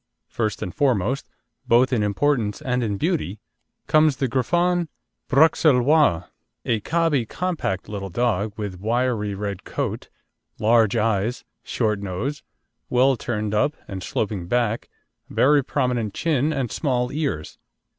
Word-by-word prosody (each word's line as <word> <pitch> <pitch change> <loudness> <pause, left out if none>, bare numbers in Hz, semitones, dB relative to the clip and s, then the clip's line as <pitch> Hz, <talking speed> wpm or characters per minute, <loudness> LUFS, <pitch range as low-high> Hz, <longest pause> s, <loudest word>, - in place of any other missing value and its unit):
First 110 -4 -2
and 90 - -5
foremost, 130 -3 0 0.4
both 125 +3 +4
in 115 - +2
importance 105 +1 0
and 125 -1 -1
in 105 -3 -1
beauty, 150 - -1 0.5
comes 155 -3 +4
the 135 - 0
Griffon 175 +7 +1 0.4
Bruxellois, 140 - +4 0.4
a 115 -2 +1
cobby, 150 -2 +1
compact 170 - -2
little 100 -2 -5
dog, 105 0 0
with 100 -4 -5
wiry 110 -1 0
red 100 -1 -4
coat, - - -4 0.5
large 110 0 +3
eyes, 110 +1 0 0.2
short 105 -4 -1
nose, 100 +10 -4 0.5
well 130 +2 +4
turned 110 -3 -3
up, 140 +8 +1
and 95 -1 -6
sloping 95 -2 -3
back, 115 +1 0 0.4
very 145 +1 +4
prominent 125 -6 -1
chin, 155 -2 +1
and 135 -6 -2
small 125 -4 0
ears. 140 - -3
120 Hz, 125 wpm, -23 LUFS, 105-140 Hz, 0.5 s, both